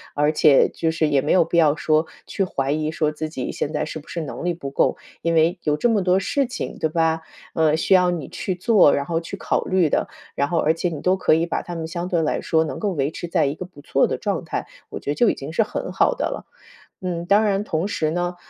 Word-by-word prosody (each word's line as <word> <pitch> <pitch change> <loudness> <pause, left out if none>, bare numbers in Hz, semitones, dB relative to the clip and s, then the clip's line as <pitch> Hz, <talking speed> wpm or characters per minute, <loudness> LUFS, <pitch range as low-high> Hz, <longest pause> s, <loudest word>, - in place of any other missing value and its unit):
而 150 +1 +2
且 150 -3 +5
就 165 - -2
是 160 -1 +1
也 145 -2 +2
没 150 - -1
有 180 -2 +5
必 170 - -1
要 155 -3 +5
说 155 0 +1 0.2
去 195 - -2
怀 140 -6 -2
疑 155 +1 -1
说 155 -1 0
自 155 +1 -4
己 130 -5 -4
现 145 - -3
在 - - -1
是 155 - -6
不 150 - -18
是 170 - -4
能 155 - -6
力 175 - +1
不 140 -5 -6
够， - - +1 0.2
因 170 - 0
为 165 +3 +3
有 150 -1 +1
这 240 - +2
么 220 -3 +2
多 185 +1 +3
事 275 +8 0
情 245 - -5
对 160 - 0
吧？ 160 0 +1 0.3
呃， 155 -1 +3
需 190 - +2
要 180 -1 +5
你 160 -7 -4
去 185 - -3
做， 190 - +4
然 140 - 0
后 165 0 -1
去 170 +4 -7
考 - - -1
虑 185 -3 +2
的。 - - 0 0.3
然 140 - +1
后 170 - 0
而 155 +2 +3
且 175 +2 -1
你 155 -4 -6
都 185 +1 +3
可 185 - +3
以 165 - +1
把 170 - -2
它 175 - -7
们 160 -1 -4
相 175 +1 -4
对 175 -2 +1
来 150 - -1
说 160 0 +2
能 160 - -5
够 210 - 0
维 145 -3 -1
持 175 - -6
在 170 - +2
一 140 - 0
个 185 - -6
不 175 -5 -15
错 - - +2
的 - - -2
状 - - -2
态， - - -4 0.2
我 - - -6
觉 145 - -3
得 - - -2
就 235 +4 +4
已 - - +2
经 140 +3 -7
是 225 - +2
很 - - -5
好 - - +2
的 - - -1
了。 - - -5 0.6
嗯， 175 -2 -3
当 205 +4 +4
然 200 -1 +1
同 170 -2 -1
时 155 -6 -1
呢 175 +1 -2
165 Hz, 295 characters per minute, -22 LUFS, 155-180 Hz, 0.6 s, 且